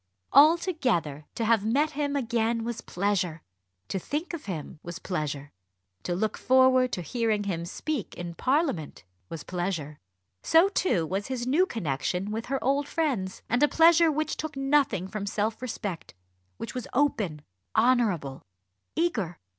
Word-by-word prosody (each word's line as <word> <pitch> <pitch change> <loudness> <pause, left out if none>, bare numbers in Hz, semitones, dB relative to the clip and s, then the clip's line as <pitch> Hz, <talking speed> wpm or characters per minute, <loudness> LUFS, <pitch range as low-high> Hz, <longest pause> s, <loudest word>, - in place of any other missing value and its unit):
Altogether, 270 - +3
to 230 - -1
have 225 -2 +3
met 280 +8 +2
him 285 -1 -2
again 230 -3 0
was 230 -1 -4
pleasure; 180 -5 -1 0.4
to 190 - -2
think 300 - -4
of 335 - -6
him 165 -3 -6
was 175 0 -7
pleasure; 145 -5 -4 0.5
to 175 - -2
look 215 +4 -1
forward 260 0 +4
to 180 - -2
hearing 220 0 0
him 170 -4 -3
speak 260 - -4
in 175 -1 -6
Parliament 260 - -1 0.3
was 160 - -6
pleasure; 175 -5 -3 0.4
so 330 +4 +5
too 280 - +1
was 190 +5 -3
his 255 -2 -3
new 315 +9 +3
connection 180 - -2
with 225 +1 -4
her 270 +2 0
old 280 +2 +1
friends. 255 - -2
And 245 +3 +1
a 295 - +6
pleasure 330 +1 +5
which 310 +1 -2
took 310 -3 -5
nothing 270 -9 +2
from 200 0 -5
self 215 +3 -1
respect; 205 - -5 0.4
which 220 - -6
was 250 -2 -5
open, 210 - 0 0.3
honourable, 220 - +2 0.5
eager. 230 - 0
225 Hz, 150 wpm, -27 LUFS, 180-280 Hz, 0.5 s, a